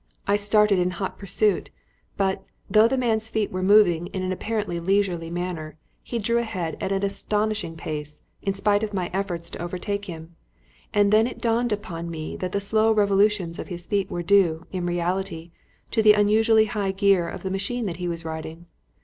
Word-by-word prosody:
I 200 - +3
started 205 -1 +3
in 180 0 +2
hot 190 0 -4
pursuit, 200 +1 0 0.5
but, 190 -1 0 0.2
though 215 +1 +5
the 265 +3 0
man's 225 -3 0
feet 215 -2 -1
were 185 - -3
moving 185 -4 +4
in 190 -1 -4
an 185 - -1
apparently 205 -2 -2
leisurely 180 -2 0
manner, 170 -3 -4 0.2
he 240 - -4
drew 235 +2 +1
ahead 185 -8 -3
at 190 - -2
an 195 0 0
astonishing 210 -3 -1
pace, 150 -1 -6 0.2
in 195 - -1
spite 205 +1 +2
of 215 -2 -3
my 180 -2 -2
efforts 175 -3 -2
to - - -7
overtake 195 +4 -3
him; 165 -2 -9 0.6
and 205 -1 +3
it - - -1
then 245 +1 -3
dawned 235 0 0
upon 180 -5 -4
me 155 -2 -5
that 185 -1 -3
the 200 - 0
slow 220 +2 +2
revolutions 200 -4 +2
of - - -5
his 175 -2 -6
feet 200 0 -1
were 175 - -3
due, 175 -4 +3
in 180 -2 -2
reality, 175 -1 -2 0.4
to 225 - +2
the 215 -1 +7
unusually 220 +2 +4
high 205 -3 -1
gear 195 -3 +2
of - - -8
the 190 - -3
machine 210 +5 -2
that 175 -5 -3
he 180 -1 -3
was 165 -1 -4
riding. 160 +1 -6
195 Hz, 190 wpm, -24 LUFS, 175-210 Hz, 0.6 s, the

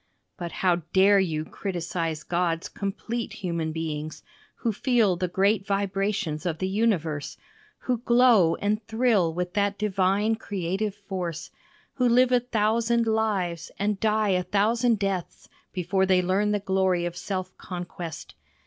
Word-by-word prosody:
But 170 -1 -6
how 180 -2 +2 0.2
dare 195 +1 +6
you 160 -5 -1
criticize 170 -4 -3
God's 170 0 -1
complete 225 +4 -4
human 170 -5 -3
beings, 155 -1 -4 0.3
who 230 - -1
feel 225 -5 +2
the 180 +1 -1
great 195 +3 +2
vibrations 195 -5 -1
of 170 -3 -2
the 185 - -2
universe, 185 -8 0 0.4
who 250 -2 -1
glow 235 -8 +5
and 215 +2 -1
thrill 220 -7 +2
with 180 +1 -3
that 200 0 +1
divine 205 +2 +1
creative 195 0 -3
force, 180 -4 -5 0.4
who 250 -2 +2
live 250 +1 +4
a 250 - +5
thousand 230 0 +1
lives 200 -7 0
and 205 0 -1
die 215 -1 +2
a 180 -1 +2
thousand 220 +5 +2
deaths 195 -3 -3 0.2
before 190 +1 0
they 185 -1 +4
learn 195 +3 +1
the 210 - +2
glory 190 -2 +1
of 175 0 -4
self 185 0 -4
conquest. 175 -3 -7
195 Hz, 140 wpm, -26 LUFS, 175-215 Hz, 0.4 s, dare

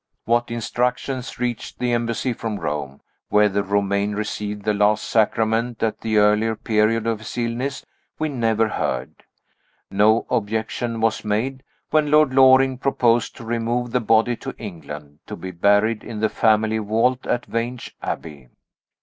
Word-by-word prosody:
What 120 +1 +1
instructions 125 +2 -2
reached 120 -2 -3
the 125 -1 -1
Embassy 120 +1 -1
from 110 -2 -4
Rome 70 -2 -4 0.3
whether 105 -1 +3
Romayne 100 +1 0
received 105 -1 -4
the 105 0 +1
last 105 +1 +2
sacrament 115 +1 +1
at 110 - -1
the 110 -1 0
earlier 105 +2 +3
period 110 +1 +1
of 115 -2 0
his 110 - -8
illness 120 +3 -2 0.3
we 155 - -1
never 115 -5 +1
heard. 105 - -2 0.8
No 105 +3 +3
objection 110 +1 -2
was 115 -1 +1
made, 120 +6 -1 0.3
when 155 -1 +3
Lord 150 -2 +4
Loring 130 -1 +5
proposed 120 -4 +1
to 115 - -10
remove 120 +1 -1
the 125 0 +1
body 115 +2 +3
to - - -7
England, 75 -7 -9
to - - -6
be 95 - -7
buried 105 +5 +2
in 110 -2 -6
the 110 0 +2
family 110 0 +2
vault 115 +5 0
at 120 - 0
Vange 120 +1 -4
Abbey. 70 -6 -6
115 Hz, 150 wpm, -22 LUFS, 105-120 Hz, 0.8 s, Loring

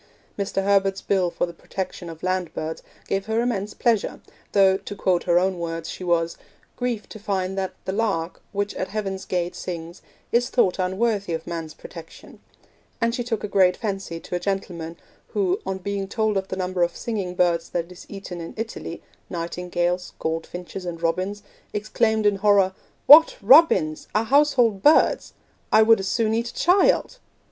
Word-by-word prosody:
Mr. 195 -1 -2
Herbert's 195 -1 +2
Bill 190 -3 +1
for - - -1
the 170 - -9
protection 180 0 -6
of 160 -1 -10
land 185 -2 -1
birds 160 +1 -4 0.3
gave 195 +1 -1
her 220 +1 +1
immense 210 -4 -1
pleasure, 230 -4 +1 0.3
though, 195 -2 +5
to 200 +1 -8
quote 185 -2 +1
her 175 -1 +3
own 185 0 +1
words, 165 -1 -4
she - - -8
was 170 -1 0 0.4
'grieved 245 -4 -3
to 215 - -8
find 190 -2 -2
that 190 -1 -3
"the - - -1
lark, 195 -6 -1
which 205 0 -2
at 185 - -3
heaven's 195 -2 -4
gate 175 -1 -1
sings," 170 0 -6 0.3
is 240 +1 +2
thought 195 -7 +2
unworthy 195 0 0
of 160 0 -4
man's 165 -2 -5
protection'; 165 -1 -12 0.6
and 230 -1 +1
she 245 - -2
took 230 -3 -3
a - - -1
great 185 -2 +3
fancy 195 -5 -4
to - - -10
a 175 - 0
gentleman 175 -3 -4 0.4
who, 385 +1 +1
on 190 - -1
being 195 +1 -3
told 220 0 0
of 190 0 -1
the 185 - -5
number 185 -1 -2
of 175 0 +1
singing 200 -6 -3
birds 170 -2 +1
that 170 0 -3
is 180 - -12
eaten 195 -3 -7
in 165 - -8
Italy 220 -6 -6 0.3
nightingales, 175 +1 -2
goldfinches, 175 +3 -4
and 170 -1 -6
robins 185 +5 -1 0.3
exclaimed 220 +1 0
in 205 -1 +3
horror, 200 -2 +4 0.3
'What! 315 +3 +9
robins! 215 - +5
our 215 - +3
household 250 -6 +3
birds! 300 +7 +4 0.4
I 220 - +7
would 225 -1 +5
as 195 - -3
soon 220 0 +1
eat 235 +1 -1
a - - -13
child!' 390 +7 +3
195 Hz, 175 wpm, -24 LUFS, 175-215 Hz, 0.6 s, What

